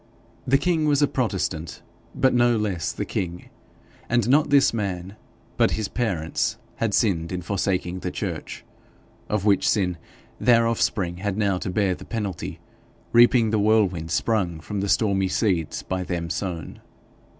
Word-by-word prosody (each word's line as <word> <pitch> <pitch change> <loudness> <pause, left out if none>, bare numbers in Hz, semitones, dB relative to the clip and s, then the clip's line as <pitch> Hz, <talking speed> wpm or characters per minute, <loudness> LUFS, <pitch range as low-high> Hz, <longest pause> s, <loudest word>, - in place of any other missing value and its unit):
The 135 +2 +5
king 165 0 +1
was 145 -1 +3
a - - +5
protestant, 95 - -2 0.3
but 130 - +3
no 120 -1 +3
less 100 -6 -1
the - - -4
king; 90 -1 -4 0.6
and 120 -2 +2
not 145 +4 +4
this 140 -4 +4
man, 95 -3 -3 0.4
but - - +4
his 110 -2 -2
parents, 95 -10 -1 0.2
had 110 -3 0
sinned 85 -6 +1
in 90 -1 -4
forsaking 90 -1 -1
the - - -3
church - - -5 0.6
of 105 -2 -1
which 100 -2 +3
sin 90 -5 0 0.4
their 115 -2 +4
offspring 95 -6 0
had 100 +1 -3
now 100 -4 +1
to - - -4
bear 95 0 +1
the - - -9
penalty, 100 -7 -4 0.5
reaping 120 -1 +5
the 110 - +2
whirlwind 100 -6 +2
sprung 90 -3 0
from 100 +6 -5
the 100 +1 -2
stormy 100 -3 +2
seeds 90 -5 0
by 95 0 -3
them 85 -2 -3
sown. 85 -6 -5
100 Hz, 155 wpm, -24 LUFS, 90-115 Hz, 0.6 s, The